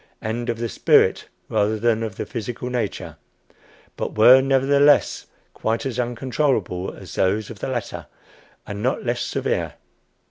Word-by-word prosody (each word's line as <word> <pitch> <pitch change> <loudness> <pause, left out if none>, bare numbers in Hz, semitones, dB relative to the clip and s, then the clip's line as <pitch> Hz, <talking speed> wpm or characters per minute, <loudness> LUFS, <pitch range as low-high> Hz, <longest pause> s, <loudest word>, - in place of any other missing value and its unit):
and 120 +2 -3
"of 115 - -1
the 115 0 -2
spirit - - +3 0.2
rather 110 0 +1
than 115 0 +1
of 110 -4 -4
the - - -4
physical 120 +1 -5
nature; 120 -5 -3 0.8
but - - -5
were, 125 +4 +8
nevertheless, 140 +2 +3 0.3
quite 115 +5 -2
as 125 -2 -3
uncontrollable 120 -6 -1
as - - -11
those 105 +4 0
of 105 - -10
the - - -4
latter, 120 -4 -4 0.6
and 105 0 -6
not 130 +3 -1
less 120 0 -1
severe." - - -2
120 Hz, 145 wpm, -22 LUFS, 110-130 Hz, 0.8 s, were